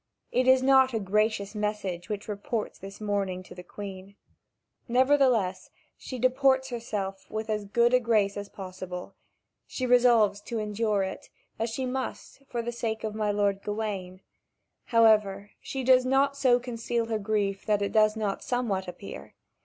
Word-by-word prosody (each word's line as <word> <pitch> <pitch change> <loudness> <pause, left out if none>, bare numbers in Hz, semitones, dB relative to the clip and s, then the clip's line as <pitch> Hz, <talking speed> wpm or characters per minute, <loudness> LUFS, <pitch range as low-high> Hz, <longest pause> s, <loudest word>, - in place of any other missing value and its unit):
It 255 +1 +1
is 260 0 +6
not 265 -2 +5
a - - +1
gracious 205 0 0
message 210 -4 -3
which 205 -1 -4
reports 210 +1 -4
this 195 +1 -10
mourning 200 -3 -2
to 180 - -12
the 180 - -9
Queen. 195 +1 -9 0.7
Nevertheless, 250 -6 +2 0.3
she 255 - -7
deports 265 +1 +3
herself 210 -5 -4
with 220 0 -3
as 210 -1 -2
good 235 +4 +2
a 250 - +6
grace 215 -4 +2
as 200 0 -6
possible. 185 -2 -7 0.5
She 255 - -3
resolves 235 -5 +4
to 230 +2 -5
endure 210 -1 0
it, 190 - -6 0.3
as 225 +1 0
she 260 +4 -3
must, 260 +2 -5
for 235 -1 -3
the 240 - -3
sake 225 -2 -3
of 215 -1 -3
my 215 -1 -1
lord 200 -1 +1
Gawain. 200 -4 -4 0.6
However, 210 -3 +3
she 265 -1 -4
does 255 0 +5
not 270 +2 +2
so 255 -3 +4
conceal 235 -1 -2
her 225 -1 -2
grief 200 -2 -1
that 205 -1 +2
it 200 - -2
does 215 -1 +4
not 210 -3 -2
somewhat 220 -7 -1
appear. 180 +2 -9
215 Hz, 160 wpm, -28 LUFS, 200-245 Hz, 0.7 s, is